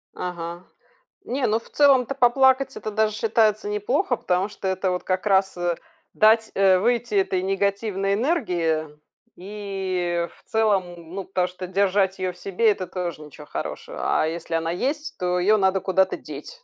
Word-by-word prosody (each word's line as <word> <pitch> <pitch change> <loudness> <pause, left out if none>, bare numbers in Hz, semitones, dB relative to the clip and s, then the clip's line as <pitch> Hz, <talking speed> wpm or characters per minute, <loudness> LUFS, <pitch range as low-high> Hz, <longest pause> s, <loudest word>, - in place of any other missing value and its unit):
Ага, 175 -1 -5 0.6
не, 260 +1 -1
ну, 220 +2 +2
в - - -19
целом-то 275 -3 +4
поплакать- 265 +1 +3
это 215 - -5
даже 215 0 +1
считается 215 -1 +1
неплохо. 245 - 0
Потому 185 +2 0
что 195 - -6
это 190 0 0
вот 180 - -3
как 185 +1 -1
раз, 195 -2 +2
э, 175 -1 0 0.4
дать, 220 +1 +4
э, 190 -1 +5
выйти 235 +1 0
этой 190 -2 +1
негативной 195 0 0
энергии, 180 - 0 0.5
и 185 -3 -3
в - - -25
целом. 180 -6 0
Ну, 195 - -3
потому 185 -1 0
что 180 +1 -8
держать 190 0 +1
её 185 -1 -2
в - - -19
себе- 200 +4 +2
это 185 -3 -4
тоже 175 -4 -4
ничего 150 0 -12
хорошего, - - -6 0.2
а - - +2
если 165 +1 -4
она 165 0 -1
есть, 295 - -3
то 180 -1 0
её 210 +4 +4
надо 190 -1 +2
куда-то 190 0 +1
деть. - - -10
195 Hz, 165 wpm, -24 LUFS, 180-220 Hz, 0.6 s, э